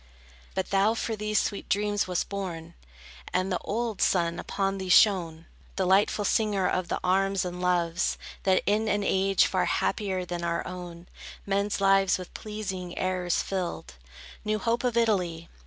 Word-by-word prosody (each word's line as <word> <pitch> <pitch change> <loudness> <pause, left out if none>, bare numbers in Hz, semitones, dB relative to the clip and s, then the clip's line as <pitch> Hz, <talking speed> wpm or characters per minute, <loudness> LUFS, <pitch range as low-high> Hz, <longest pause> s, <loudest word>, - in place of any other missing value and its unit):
But 190 - -2
thou 200 +3 +3
for 225 0 -2
these 210 0 -1
sweet 200 - -3
dreams 205 0 +1
wast 180 -1 -1
born, 175 -4 -5 0.6
And 185 +1 +1
the 180 - 0
old 225 -2 -3
sun 170 -2 +2
upon 195 0 -2
thee 190 -1 -5
shone, 175 -5 +4 0.3
Delightful 195 +2 +2
singer 205 -3 +1
of 185 -1 -1
the - - -2
arms, 195 +1 +2
and 180 0 -5
loves, 175 -1 +1 0.2
That 190 -1 +2
in 215 +2 +1
an 205 -1 +1
age 195 0 +3
far - - +1
happier 190 -4 -1
than 175 -1 -4
our 170 0 -1
own, 175 -2 -8 0.4
Men's 200 +1 0
lives 195 -1 +4
with 185 -1 -9
pleasing 190 -4 -5
errors 185 -2 0
filled. 175 - -4 0.5
New 215 0 0
hope 230 +4 0
of 245 -2 0
Italy! 180 -8 0
190 Hz, 155 wpm, -27 LUFS, 180-205 Hz, 0.6 s, shone